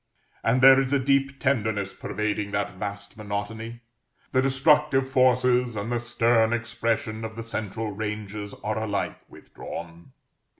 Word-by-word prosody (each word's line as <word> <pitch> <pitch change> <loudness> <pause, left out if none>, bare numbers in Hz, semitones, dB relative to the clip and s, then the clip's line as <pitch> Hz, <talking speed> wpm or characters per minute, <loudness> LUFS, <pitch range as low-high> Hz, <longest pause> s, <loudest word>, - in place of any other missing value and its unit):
And 125 +3 +2
there 135 +1 +8
is 135 +1 -2
a - - +5
deep 135 0 +1
tenderness 110 -7 0
pervading 105 -1 -2
that 100 0 -1
vast 100 +2 -6
monotony. 110 +3 -5 0.5
The 130 - +3
destructive 135 0 +3
forces 125 -2 +3
and 105 +3 -3
the 120 - +1
stern 115 -1 +2
expression 115 -2 -2
of 110 0 -6
the 115 - -5
central 110 -1 -4
ranges 105 0 -5
are 110 +1 -1
alike 105 -2 -2
withdrawn. 85 0 -10
115 Hz, 135 wpm, -26 LUFS, 105-130 Hz, 0.5 s, there